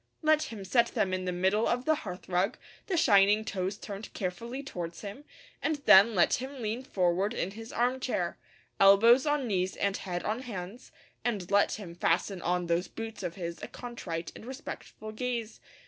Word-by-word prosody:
Let 310 0 +4
him 205 -4 -7
set 235 +4 +3
them 205 -7 0
in 185 0 -2
the 180 - -1
middle 190 +5 +2
of 245 +1 0
the 315 - +4
hearthrug, 185 - -2 0.3
the 375 -4 0
shining 205 -5 +5
toes 190 0 -2
turned 205 0 -8
carefully 235 +8 -4
towards 175 -10 -6
him, 210 +8 -8 0.4
and 315 - +1
then 205 +4 +8
let 175 - +4
him 270 +1 -7
lean 225 +1 -2
forward 190 -2 0
in 190 - -2
his 225 +3 -9
arm 250 +2 +1
chair, 180 -9 -2 0.4
elbows 230 +8 +7
on 295 -2 +1
knees 190 -4 -1
and 200 0 0
head 175 -2 -4
on 220 +3 -1
hands, 215 -2 -7 0.3
and 205 -7 -2
let 205 0 +4
him 195 -5 -7
fasten 175 +2 0
on 180 0 0
those 170 +2 0
boots 225 -1 -7
of 170 - -4
his 170 -2 -5
a - - -5
contrite 180 -9 -6
and - - -10
respectful 255 -4 -8
gaze. 235 0 -3
205 Hz, 180 wpm, -30 LUFS, 185-240 Hz, 0.4 s, then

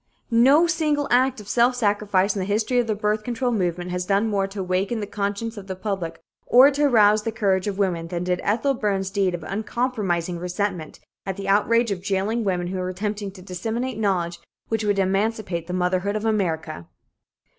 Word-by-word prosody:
No 270 +8 +6
single 305 -4 0
act 255 0 +3
of 210 - -11
self 245 +3 +3
sacrifice 205 -3 +1
in - - -2
the 185 - -1
history 215 +5 +1
of 240 - 0
the 215 - 0
birth 210 +1 -1
control 245 +2 -1
movement 180 -4 -1
has 180 0 -2
done 200 +4 +1
more 195 -1 +1
to 195 +1 -8
awaken 190 +5 -1
the 210 - -3
conscience 205 +3 -3
of 195 -1 -8
the 190 - -4
public 185 -4 -4 0.3
or 260 +4 +7
to 290 +1 +1
arouse 215 -5 +5
the 225 - -3
courage 195 -3 0
of 200 -2 -2
women, 175 -4 0
than 175 0 -3
did 180 0 -1
Ethel 240 +7 +1
Byrne's 195 -5 -1
deed 195 -3 +1
of 170 - -8
uncompromising 195 -4 -2
resentment 180 -2 -3 0.3
at 190 0 -3
the 195 -1 -5
outrage 230 +3 +3
of 185 -3 -3
jailing 200 +4 -1
women 180 -3 -1
who 185 +1 -3
were 180 0 -2
attempting 205 +2 -3
to 185 -2 -13
disseminate 225 +7 -3
knowledge 180 -5 0 0.3
which 225 -1 -1
would 205 -1 +1
emancipate 195 -2 -1
the - - -5
motherhood 185 +2 0
of 215 +1 -2
America. 160 - -1
200 Hz, 200 wpm, -23 LUFS, 185-225 Hz, 0.3 s, or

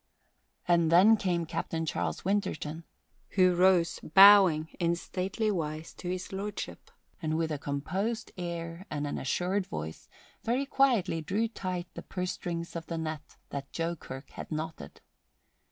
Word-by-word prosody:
And 170 -2 +4
then 195 +6 +7
came 175 -5 0
Captain 165 0 -3
Charles 85 - -2
Winterton, 170 -5 -1 0.5
who 185 -1 +6
rose, 180 -1 +4
bowing 190 -3 +7
in 170 -1 +2
stately 195 +5 -2
wise 155 -3 -3
to 180 - -6
His 185 +1 -4
Lordship, 200 +2 -5 0.3
and 155 -1 0
with 165 -1 0
a 150 - -2
composed 185 +12 -2
air 170 0 -5
and 150 -1 -2
an 145 - -3
assured 185 +7 0
voice 80 +1 -6 0.3
very 250 +4 +1
quietly 240 -12 +2
drew 205 +9 0
tight 185 -5 -4
the - - -7
purse 180 -1 -3
strings 170 -1 -5
of 165 -1 -5
the 165 - -3
net 155 -2 -5
that 140 -1 -5
Joe 165 +1 -2
Kirk 135 -3 -9
had - - -8
knotted. 160 +1 -5
170 Hz, 150 wpm, -30 LUFS, 160-190 Hz, 0.5 s, then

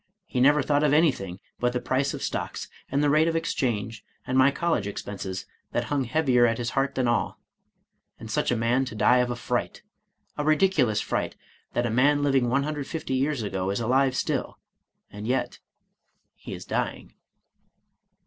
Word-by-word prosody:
He 125 - -3
never 145 +2 +5
thought 145 +1 +2
of 145 -1 +3
anything 125 - +2 0.2
but 125 0 +1
the 125 - 0
price 130 +3 0
of - - -6
stocks, - - -3 0.2
and 140 +2 +1
the 145 - +3
rate 155 +2 +4
of 165 - 0
exchange, 115 -9 -2 0.2
and 125 - -2
my 130 +1 +6
college 140 - 0
expenses, 95 -2 -5 0.3
that 120 - +1
hung 140 -2 +1
heavier 125 -2 +3
at 115 0 0
his 120 -1 -2
heart 140 0 0
than 130 -2 +1
all; 120 0 0 0.8
and 110 -1 -8
such - - 0
a 125 - +2
man 120 +3 +2
to 115 - -7
die 125 +4 +4
of 125 0 +2
a 120 - -2
fright, 120 - -3 0.3
— - - -43
a - - +1
ridiculous 150 - +3
fright, - - -2 0.4
that 120 - +1
a 120 - -1
man 145 +5 +3
living 135 -4 +2
150 145 +2 -2
years 135 -1 0
ago 95 -2 -2
is 100 - -1
alive 130 +3 +2
still, - - -2 0.5
and 105 +1 -7
yet 130 +2 -1 0.4
— - - -48
he - - -8
is - - -9
dying." - - -3
130 Hz, 185 wpm, -26 LUFS, 115-145 Hz, 0.8 s, my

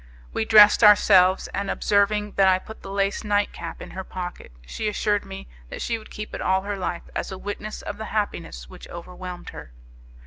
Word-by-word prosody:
We 220 - -1
dressed 215 +1 +7
ourselves, 195 -3 +6
and 200 0 -3
observing 210 0 +1
that 195 -1 +3
I 185 -1 +5
put 220 +4 -11
the - - -9
lace 195 +2 -1
night 205 -1 +1
cap - - -7
in - - -11
her 190 - -6
pocket 180 - -7
she 215 - -4
assured 210 0 0
me 65 0 -9 0.2
that - - -7
she 230 -1 -2
would 215 - -15
keep 210 0 -8
it - - -5
all 190 0 +1
her 205 0 -3
life 180 -2 -4
as - - -3
a 190 - -6
witness 205 +2 -6
of 205 - -6
the 220 - -4
happiness 205 - -3
which - - -12
overwhelmed 180 +1 -8
her. - - -11
200 Hz, 205 wpm, -24 LUFS, 185-210 Hz, 0.2 s, dressed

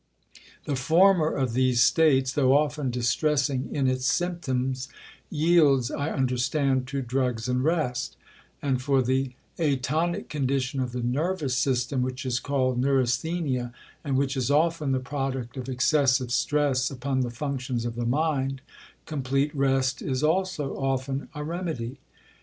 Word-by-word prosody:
The 145 - -1
former 165 +5 +4
of 130 -4 -1
these 125 -1 +3
states, 135 -2 +3
though 135 -1 +4
often 150 -2 0
distressing 130 +2 0
in 135 -3 0
its 130 0 0
symptoms, 135 -8 -1 0.4
yields, 150 -6 +3
I 145 +2 -2
understand, 130 0 0
to 135 0 -3
drugs 125 -2 -1
and 125 0 0
rest; 145 -6 -1 0.5
and 130 -3 0
for 135 0 +2
the 130 +1 0 0.3
atonic 155 +3 0
condition 135 -2 -1
of 125 -2 -2
the 125 0 -4
nervous 145 +2 -1
system, 130 0 0
which 130 +1 -3
is 125 -2 0
called 130 -3 0
neurasthenia, 130 0 0 0.3
and 140 -4 0
which 135 0 0
is 130 -1 -1
often 155 0 +2
the 130 - +1
product 130 -3 -4
of 130 -1 -6
excessive 130 -1 +2
stress 140 -1 +1
upon 135 0 -2
the 125 -2 0
functions 125 -1 -3
of 120 - -2
the 120 0 -3
mind, 135 -1 0 0.4
complete 140 -1 -1
rest 135 -2 +1
is 130 0 -2
also 160 -3 0
often 135 0 -2
a 150 - -4
remedy. 155 -7 -4
135 Hz, 140 wpm, -26 LUFS, 125-150 Hz, 0.5 s, former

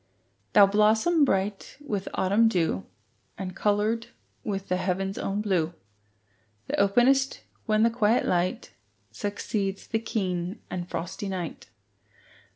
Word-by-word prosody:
Thou 205 -2 +9
blossom 220 - +3
bright 195 -5 -1
with 210 -10 -4
autumn 200 +5 +3
dew, 165 - 0 0.5
And 185 -1 -5
coloured 215 +2 +1 0.4
with 195 -2 -3
the 180 - +1
heaven's 190 +1 -2
own 200 +1 -1
blue, 175 -5 0 0.9
That - - -2
openest 245 +7 +3 0.3
when 215 0 +3
the 230 - +4
quiet 225 0 +2
light 180 +1 0 0.4
Succeeds 200 -1 -3
the 225 - -1
keen 185 -3 -2
and 180 -1 -4
frosty 195 +4 -4
night. 180 -4 -5
200 Hz, 120 wpm, -27 LUFS, 185-220 Hz, 0.9 s, Thou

